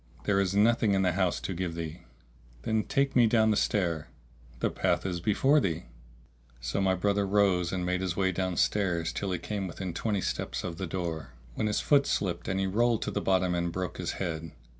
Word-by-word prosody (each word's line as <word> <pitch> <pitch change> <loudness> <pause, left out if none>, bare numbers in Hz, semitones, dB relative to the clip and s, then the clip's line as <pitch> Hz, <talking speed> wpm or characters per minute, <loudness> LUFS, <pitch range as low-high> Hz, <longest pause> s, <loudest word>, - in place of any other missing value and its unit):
"There 100 -1 +2
is 100 0 0
nothing 110 -1 +4
in 95 - +2
the 90 - +3
house 90 0 +1
to 95 - -3
give 85 -1 -3
thee." 85 0 -5 0.6
"Then 110 +5 0
take 140 0 +1
me 120 -2 +6
down 110 -1 +4
the - - +2
stair." 85 -8 0 0.5
"The - - 0
path 90 -2 0
is 90 -2 -2
before 135 - +3
thee." 85 - -1 0.8
So - - -2
my 95 -1 +3
brother 100 +2 +1
rose 95 -4 +2
and 90 -1 -2
made 90 +1 0
his 95 -2 -2
way 95 -1 +2
downstairs, 90 -1 0
till 100 -1 -2
he 90 - 0
came 100 +2 -4
within 90 0 -5
twenty 100 +2 -1
steps - - -3
of 85 -2 -5
the 95 - -3
door, 85 -3 -4 0.2
when 110 - -1
his 105 - 0
foot 140 -2 +4
slipped 85 -3 -1
and 95 0 0
he 95 - +1
rolled 115 +4 +2
to - - -3
the 100 - -2
bottom 95 -2 +2
and 85 0 -1
broke 90 0 -4
his - - -2
head. 80 -3 -4
95 Hz, 210 wpm, -29 LUFS, 85-105 Hz, 0.8 s, me